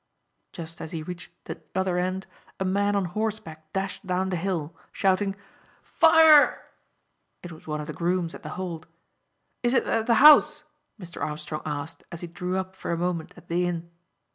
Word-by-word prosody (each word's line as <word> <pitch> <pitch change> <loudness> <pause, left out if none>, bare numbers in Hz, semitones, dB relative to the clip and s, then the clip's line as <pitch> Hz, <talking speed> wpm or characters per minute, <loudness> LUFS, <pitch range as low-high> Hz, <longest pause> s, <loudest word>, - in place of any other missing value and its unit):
Just 165 0 -8
as 160 - -7
he 160 -2 -4
reached 175 +1 -8
the - - -7
other 190 -1 +1
end 185 +1 -2 0.3
a 190 - -1
man 200 +2 +1
on 200 -2 +1
horseback 175 -5 -4
dashed 195 +1 -3
down 185 +1 0
the - - 0
hill, 170 -3 -3 0.2
shouting 195 0 +1 0.5
"Fire!" 320 -2 +5 0.7
It 175 - -8
was 160 0 -13
one 150 0 -2
of 150 - -5
the 155 - -6
grooms 175 0 -1
at - - -10
The - - -7
Hold. 175 -3 -5 0.7
"Is 245 +1 +1
it - - +4
at 225 -1 -1
the 235 - +4
house?" 300 +3 +7 0.4
Mr. 175 -3 -9
Armstrong 150 0 -4
asked, 150 +1 -5
as 170 - -7
he 175 - -5
drew 180 +2 -3
up 190 0 -4
for - - -7
a 170 - 0
moment 170 -2 -2
at - - -15
the 175 +1 0
inn. 170 -1 -4
180 Hz, 185 wpm, -26 LUFS, 165-195 Hz, 0.7 s, house